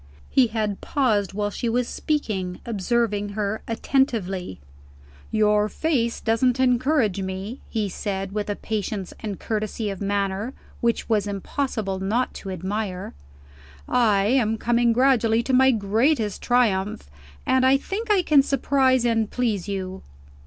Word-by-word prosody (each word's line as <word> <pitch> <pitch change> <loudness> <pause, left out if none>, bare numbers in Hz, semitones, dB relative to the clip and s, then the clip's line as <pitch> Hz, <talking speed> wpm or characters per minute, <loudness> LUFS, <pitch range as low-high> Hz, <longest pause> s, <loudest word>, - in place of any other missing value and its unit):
He 260 -2 +5
had 215 -3 -2
paused 215 -9 +1
while 205 0 -1
she 235 - -2
was 240 +1 0
speaking, 195 -12 -2
observing 210 -1 0
her 210 +1 -1
attentively. 225 - -1 0.7
"Your 210 -1 +2
face 240 -4 0
doesn't 240 +3 +1
encourage 250 - +2
me," 190 +6 -5
he 215 -3 -1
said, 195 0 -4
with 210 0 -3
a 205 - -1
patience 205 -3 -4
and 205 -4 -5
courtesy 215 -1 -2
of 195 - -7
manner 200 +3 -1 0.2
which 235 -1 +1
it - - -18
was 210 -2 +2
impossible 205 -1 -3
not 220 +7 0
to 195 - -8
admire. 190 +1 -4 0.7
"I 215 -5 +3
am 225 -1 +2
coming 240 +1 +2
gradually 235 -2 +3
to 260 - -2
my 265 +1 +6
greatest 220 +1 +1
triumph; 210 - +1 0.4
and 260 0 +3
I 260 +1 +5
think 425 +10 -5
I 400 -3 +4
can 300 -4 +5
surprise 265 -2 +2
and 225 -2 +1
please 220 -7 -1
you." 190 -1 -4
220 Hz, 140 wpm, -24 LUFS, 200-250 Hz, 0.7 s, my